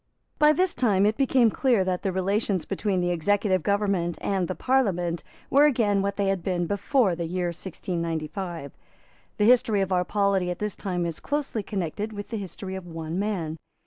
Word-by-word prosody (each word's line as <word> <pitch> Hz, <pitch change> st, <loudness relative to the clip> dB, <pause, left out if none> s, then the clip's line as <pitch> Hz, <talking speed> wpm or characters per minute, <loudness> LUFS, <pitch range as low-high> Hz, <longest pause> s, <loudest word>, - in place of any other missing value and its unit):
By 300 Hz, 0 st, +7 dB
this 365 Hz, +4 st, +1 dB
time 205 Hz, -5 st, +2 dB
it 215 Hz, +1 st, +2 dB
became 260 Hz, -4 st, +3 dB
clear 240 Hz, -6 st, +2 dB
that 185 Hz, -1 st, -1 dB
the 195 Hz, -, -1 dB
relations 190 Hz, 0 st, 0 dB
between 195 Hz, -1 st, -1 dB
the 175 Hz, 0 st, +1 dB
executive 185 Hz, +2 st, +1 dB
government 195 Hz, -2 st, 0 dB
and 190 Hz, -3 st, -1 dB
the 185 Hz, -, -3 dB
Parliament 180 Hz, -10 st, +1 dB, 0.3 s
were 285 Hz, +2 st, +6 dB
again 220 Hz, -8 st, +2 dB
what 200 Hz, 0 st, -1 dB
they 200 Hz, -, 0 dB
had 195 Hz, -2 st, 0 dB
been 175 Hz, -1 st, -1 dB
before 205 Hz, -, +1 dB
the 170 Hz, 0 st, -3 dB
year 180 Hz, +1 st, -1 dB
1695. 170 Hz, -2 st, -4 dB, 0.6 s
The 210 Hz, -, +3 dB
history 225 Hz, -3 st, +4 dB
of 190 Hz, 0 st, -1 dB
our 180 Hz, -1 st, +3 dB
polity 200 Hz, -2 st, +1 dB
at 180 Hz, -, -3 dB
this 210 Hz, -1 st, -3 dB
time 180 Hz, -3 st, -2 dB
is 165 Hz, -2 st, -4 dB
closely 285 Hz, -6 st, -2 dB
connected 205 Hz, +2 st, -3 dB
with 205 Hz, 0 st, -7 dB
the 225 Hz, -, -3 dB
history 190 Hz, -1 st, -6 dB
of 190 Hz, -2 st, -6 dB
one 165 Hz, +1 st, -4 dB
man. 180 Hz, -7 st, -2 dB
195 Hz, 185 wpm, -26 LUFS, 175-210 Hz, 0.6 s, By